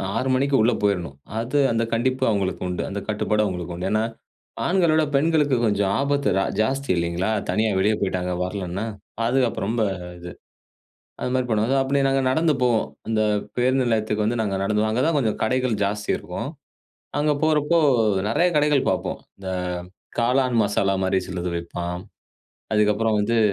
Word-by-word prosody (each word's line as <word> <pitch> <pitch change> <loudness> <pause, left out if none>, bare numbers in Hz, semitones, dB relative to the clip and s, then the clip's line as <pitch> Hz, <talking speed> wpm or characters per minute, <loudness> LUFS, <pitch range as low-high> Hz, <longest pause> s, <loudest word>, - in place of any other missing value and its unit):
6 130 +3 0
மணிக்கு 140 +1 +1
உள்ள 115 +3 +4
போயிரணும். 90 -9 0 0.2
அது 125 +5 -1
அந்த 115 0 +1
கண்டிப்பு 130 +3 0
அவங்களுக்கு 100 -3 -1
உண்டு. 90 - -2
அந்த 100 - -3
கட்டுப்பாடும் 105 0 +1
அவங்களுக்கு 90 -2 -4
உண்டு. 90 +2 -3
ஏன்னா 110 +1 +2 0.6
ஆண்கள 175 -2 +3
விட 160 - +4
பெண்களுக்கு 150 -2 +3
கொஞ்சம் 100 -2 +1
ஆபத்து 140 -4 +1
ரா 95 - +2 0.2
ஜாஸ்தி 135 +5 -1
இல்லைங்களா? 85 +3 -1 0.2
தனியா 110 +1 +2
வெளியே 105 +3 +3
போயிட்டாங்க 90 -2 -1
வரலன்னா 95 +2 -4 0.4
பாதுகாப்பு 120 +1 +1
ரொம்ப 115 0 0 0.4
இது. 85 0 -8 0.9
அது 125 - -2
மாதிரி 130 -1 +1
பண்ணுவாங்க. 110 +4 +2
ஸோ - - +3
அப்டி 140 +1 +1
நாங்க 135 0 +2
நடந்து 160 +2 +2
போவோம். 120 -3 +2 0.2
இந்த 110 -1 +1 0.4
பேருந்து 130 +1 +2
நிலையத்துக்கு 110 -1 0
வந்து 115 +1 0
நாங்க 100 -2 -1
நடந்துதான் 105 +2 +1
அங்கதான் 145 +7 +1
கொஞ்சம் 110 -6 0
கடைகள் 125 0 +1
ஜாஸ்தி 105 +1 -2
இருக்கும். - - -5 0.7
அங்கே 150 0 +2
போகிறப்போ 155 +1 +3 0.5
நிறைய 170 +11 +3
கடைகள் 150 -2 +3
பார்ப்போம். - - -2 0.2
இந்த 95 -1 -6 0.7
காளான் 125 0 +2
மசாலா 100 -1 +1
மாதிரி 95 0 +2
சிலது 90 -1 -3
விப்பான். 85 +1 -4 0.7
அதுக்கப்புறம் 105 +1 +2
வந்து 115 +2 +1
110 Hz, 155 wpm, -23 LUFS, 100-130 Hz, 0.9 s, உள்ள